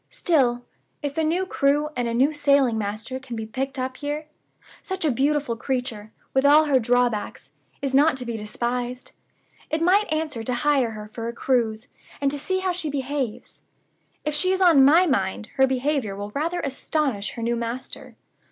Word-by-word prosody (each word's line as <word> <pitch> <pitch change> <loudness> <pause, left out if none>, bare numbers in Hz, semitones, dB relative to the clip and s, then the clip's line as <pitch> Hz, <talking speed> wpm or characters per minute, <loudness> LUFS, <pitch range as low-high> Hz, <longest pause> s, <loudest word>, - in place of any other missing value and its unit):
Still, 245 -7 +1 0.4
if 285 -1 -3
a 320 - +1
new 345 +4 +1
crew 295 -3 +1
and 245 -1 -1
a 230 - -2
new 275 +5 +3
sailing 280 -5 +3
master 220 +4 -3
can 250 -2 -8
be 220 -1 -4
picked 265 +5 -3
up 255 0 -3
here, 295 +1 -4 0.6
such 380 -3 -4
a 300 - +3
beautiful 280 -1 +1
creature 240 -4 -3 0.2
(with 265 - +3
all 295 +2 +6
her 275 -3 +3
drawbacks), 245 -2 0 0.3
is 270 -1 -1
not 285 +1 +4
to 250 - -6
be 235 -1 -3
despised. 240 +3 -3 0.6
It 315 - 0
might 375 +5 +3
answer 310 -6 -2
to 250 +2 -1
hire 275 -5 +3
her 210 0 -8
for 230 +2 -6
a 235 - -4
cruise, 235 -3 0 0.3
and 280 -1 +1
to 290 - -4
see 375 +6 -1
how 375 -1 0
she 350 -3 -3
behaves. 275 -4 -4 0.6
(If 300 - 0
she 370 +5 +1
is 380 - +1
of 355 -4 +6
my 295 +7 +7
mind, 205 - -1
her 265 0 +5
behavior 260 -5 -1
will 205 +1 -6
rather 330 +8 -2
astonish 270 -5 -2
her 230 - -6
new 235 +1 +1
master!) 235 +2 -6
265 Hz, 185 wpm, -24 LUFS, 235-300 Hz, 0.6 s, my